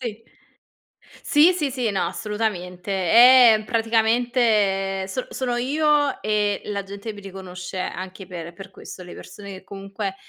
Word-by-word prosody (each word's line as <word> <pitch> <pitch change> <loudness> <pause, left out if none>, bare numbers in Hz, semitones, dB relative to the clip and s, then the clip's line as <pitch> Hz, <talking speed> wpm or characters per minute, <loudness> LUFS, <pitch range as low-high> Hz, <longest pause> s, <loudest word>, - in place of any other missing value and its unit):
Sì. 230 -3 -6 1.0
Sì, 310 +5 +5
sì, 305 -6 -2
sì. 250 -4 -1
No, 195 - -1
assolutamente. 190 -2 -4
Eh, 230 +4 +6
praticamente 225 -4 +1
sono 255 +6 -4
sono 245 -2 -2
io, 290 +2 +1
e 210 -1 0
la 200 -1 -3
gente 200 +3 -7
mi 205 - -11
riconosce 185 -1 -8
anche 185 +1 -6
per 170 -2 -8
per 195 - -11
questo. 185 - -11
Le 180 - -11
persone 200 -1 -11
che 190 -1 -10
comunque, 195 0 -6
210 Hz, 140 wpm, -22 LUFS, 195-240 Hz, 1.0 s, Eh